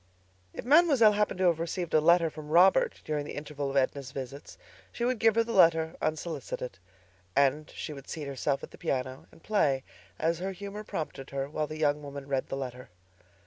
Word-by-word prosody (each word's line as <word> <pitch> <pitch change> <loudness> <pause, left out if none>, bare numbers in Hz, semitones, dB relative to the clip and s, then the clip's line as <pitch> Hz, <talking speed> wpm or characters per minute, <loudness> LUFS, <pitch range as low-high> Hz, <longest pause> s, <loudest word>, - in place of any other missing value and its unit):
If - - -8
Mademoiselle 280 -6 +6
happened 210 -2 0
to 190 - 0
have 170 -3 +3
received 170 +1 -3
a 155 - +5
letter 170 0 +4
from 150 -1 -9
Robert 190 - +4
during 150 -1 -1
the 145 - -7
interval 145 -1 -4
of 140 - -1
Edna's 135 0 0
visits, 135 +1 -8 0.3
she 235 - -2
would 250 -2 0
give 225 -1 +4
her 230 - +4
the 230 0 -5
letter 165 -3 +4
unsolicited. 155 - -4 0.6
And 140 +2 +2
she 150 - -5
would 140 -1 -11
seat 155 -2 -5
herself 140 0 -2
at - - -8
the - - -14
piano 130 0 -3
and - - -19
play 140 -11 +1 0.3
as 165 +1 0
her 190 +2 -3
humor 200 +3 -7
prompted 150 -8 -5
her 135 0 -3
while 150 +1 -2
the 155 - -7
young 150 -1 +1
woman 140 -1 -8
read 135 -2 -1
the 135 - -4
letter. 125 -1 -6
155 Hz, 200 wpm, -29 LUFS, 140-185 Hz, 0.6 s, Mademoiselle